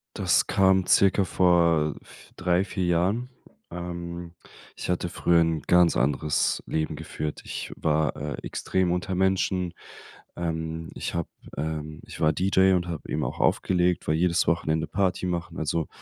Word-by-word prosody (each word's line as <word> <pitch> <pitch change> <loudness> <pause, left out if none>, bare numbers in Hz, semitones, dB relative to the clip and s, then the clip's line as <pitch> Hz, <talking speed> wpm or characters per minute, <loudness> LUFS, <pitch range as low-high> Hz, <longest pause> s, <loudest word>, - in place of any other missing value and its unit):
Das - - +2
kam 95 -2 +3
circa 100 0 +4
vor 85 -4 +3
f - - -17
3, 90 +1 +1
4 95 -1 -2
Jahren. 95 +9 +1 0.4
Ähm, 85 -1 -6 0.4
ich - - -6
hatte 90 0 0
früher 85 0 +2
'n 80 -2 +1
ganz 90 -1 +5
anderes 70 +3 +1
Leben 80 -1 -2
geführt. 75 -1 -5
Ich - - -5
war, 75 -1 +1
äh, 75 0 -4
extrem 95 -2 0
unter 90 +1 -2
Menschen. 95 -1 +1 0.6
Ähm, 80 -1 -3
ich - - -4
habe, 85 - -2 0.3
ähm 75 0 -4
ich - - -10
war 80 0 +4
DJ 95 0 +3
und 90 0 -1
habe 85 -3 -6
eben - - -1
auch - - -4
aufgelegt, 90 -1 +1
war 75 - +2
jedes 85 +1 +2
Wochenende 80 -1 +1
Party 95 -1 0
machen. 85 -1 -3
Also, 80 +1 -1
85 Hz, 155 wpm, -26 LUFS, 80-90 Hz, 0.6 s, ganz